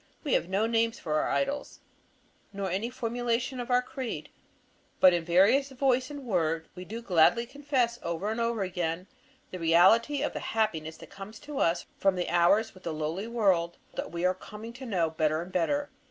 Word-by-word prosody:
We 290 - -1
have 170 - +1
no 195 +3 +1
names 230 0 +1
for 155 -2 -1
our - - 0
idols, 280 +1 -2 0.7
nor 195 -2 -3
any 200 +6 -1
formulation 245 +1 -2
of 245 - -5
our 250 0 +3
creed. 260 -1 -5 0.7
But 185 -1 +7
in 170 -1 0
various 200 +12 +4
voice 260 -1 +1
and 285 -1 -7
word 165 -6 0
we 180 0 -9
do 230 +4 -7
gladly 190 +4 +4
confess 260 -3 -1
over 170 +5 -2
and 230 +1 -2
over 230 -3 0
again 175 -1 -2 0.5
the 185 - -6
reality 190 - +4
of - - -1
the - - -3
happiness 165 -8 -1
that - - -13
comes 200 +2 -9
to 295 -1 -6
us 170 +1 +1
from 195 -1 +2
our 180 - +1
hours 175 +6 +3
with 185 - -16
the 170 -3 -4
lowly 160 +7 -3
world 190 -8 +1 0.2
that - - -5
we 170 +1 -2
are 185 - +4
coming 215 +4 -10
to 260 +1 -9
know 170 -7 0
better 155 -1 +1
and 175 +2 -6
better. 285 - 0
205 Hz, 195 wpm, -29 LUFS, 175-240 Hz, 0.7 s, But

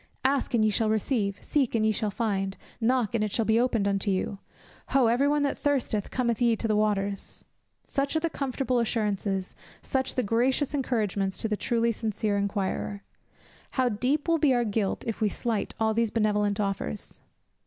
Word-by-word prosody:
"Ask 270 -2 +2
and 220 -2 +3
ye 215 - +3
shall 220 +1 +1
receive, 215 -2 0
seek 270 -6 +1
and 220 -1 +2
ye 220 - +4
shall 215 0 -1
find, 195 -3 -1 0.2
knock 240 -1 +1
and 225 -2 +1
it 210 - -1
shall 225 +2 +1
be 220 +1 +3
opened 235 -5 +1
unto 200 +1 0
you; 195 +1 -1 0.5
Ho! 265 -2 +3
every 240 +5 +3
one 295 0 +2
that 280 - -1
thirsteth, 260 -8 0
come 250 -2 0
ye 235 -2 +4
to 225 - -2
the 215 - +2
waters;" 200 -2 -1 0.4
such 275 +2 -1
are - - +4
the 335 - 0
comfortable 265 -4 -1
assurances, 205 -4 -1 0.3
such 265 -1 -1
the 255 - +1
gracious 250 +6 +1
encouragements 210 -8 -1
to - - -1
the 215 - 0
truly 235 +2 +1
sincere 215 -1 -1
inquirer. 200 0 -2 0.7
How 255 -1 +3
deep 255 +8 0
will 330 -1 +3
be 280 -5 +4
our 240 -1 +2
guilt 210 -2 -1
if 225 -1 -4
we 215 - +3
slight 225 0 -2
all 220 0 +2
these 230 0 +1
benevolent 210 -2 +1
offers. 195 - -3
225 Hz, 185 wpm, -27 LUFS, 205-250 Hz, 0.7 s, ye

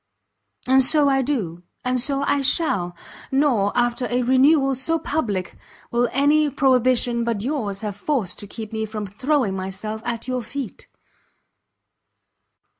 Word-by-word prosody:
And 265 +1 +5
so 290 +2 +4
I 270 -1 +3
do, 210 - -2 0.2
and 250 0 +1
so 275 +2 0
I 285 0 +1
shall! 200 - +1 0.4
nor, 265 -8 +2
after 240 +1 +1
a 245 +1 +1
renewal 270 +2 +4
so 265 +6 0
public, 230 - -2 0.4
will 240 +1 +2
any 295 +2 +3
prohibition 255 -3 +2
but 230 -3 -2
yours 225 -8 -2
have 210 -2 -4
force 230 - -1
to 205 - -8
keep 220 +1 -8
me 220 0 -1
from 215 -1 -5
throwing 230 +1 0
myself 195 +3 -4
at 235 0 -4
your 255 -1 -1
feet. 255 0 -7
245 Hz, 140 wpm, -22 LUFS, 215-275 Hz, 0.4 s, And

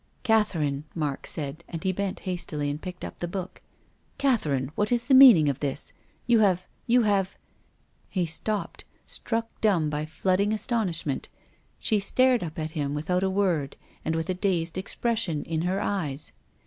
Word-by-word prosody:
"Catherine," 165 - +1
Mark 150 -4 -2
said, 150 +2 -3
and 165 0 -6
he 190 - +2
bent 195 +1 -3
hastily 165 -6 -2
and 145 +2 -6
picked 180 -1 -7
up - - -9
the 175 - -2
book. 185 +1 -6 0.3
" - - -39
Catherine, 145 - +1
what 210 +5 0
is 240 -1 +3
the 265 - +2
meaning 245 - +9
of 140 -2 0
this? 140 -1 -3 0.3
You 235 -2 +4
have 185 -4 +3
— - - -39
you 245 0 +4
have 195 -3 +1 0.4
" - - -41 0.3
He 185 -3 0
stopped, 200 +6 -2 0.2
struck 230 -1 -1 0.2
dumb 175 -8 +2
by 150 +1 -2
flooding 190 +5 +1
astonish 215 -6 0
ment. 140 -3 -3 0.5
She 215 -3 +1
stared 255 +4 +3
up 160 -2 -6
at 155 -1 -3
him 145 -2 -2
without 180 +5 0
a 190 - +1
word 180 -8 0 0.3
and 160 - -1
with 165 -1 -2
a 185 - 0
dazed 180 -3 -1
expression 195 -3 -1
in 160 -1 -2
her 185 +3 0
eyes. 155 -9 -2
180 Hz, 180 wpm, -26 LUFS, 155-210 Hz, 0.5 s, meaning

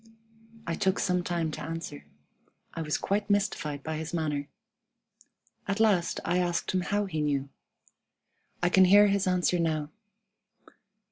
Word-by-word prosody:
I 165 - -2
took 190 +2 +1
some 180 -1 +1
time 170 -3 -1
to - - -6
answer. 160 - -6 0.7
I 165 - -4
was 150 -1 -1
quite 205 +1 -1
mystified 150 -8 0
by 160 0 -3
his 160 +2 -4
manner. 150 -3 -2 1.2
At 200 +1 -1
last 200 -6 +2
I 175 +2 +1
asked 175 -1 -1
him 185 - +1
how 205 +3 0
he 160 -6 -3
knew. 140 -2 -1 1.1
I 175 - +4
can 190 +1 +6
hear 205 +2 +7
his 200 -1 +1
answer 180 -1 +2
now. 155 -2 -1
175 Hz, 145 wpm, -28 LUFS, 155-190 Hz, 1.2 s, hear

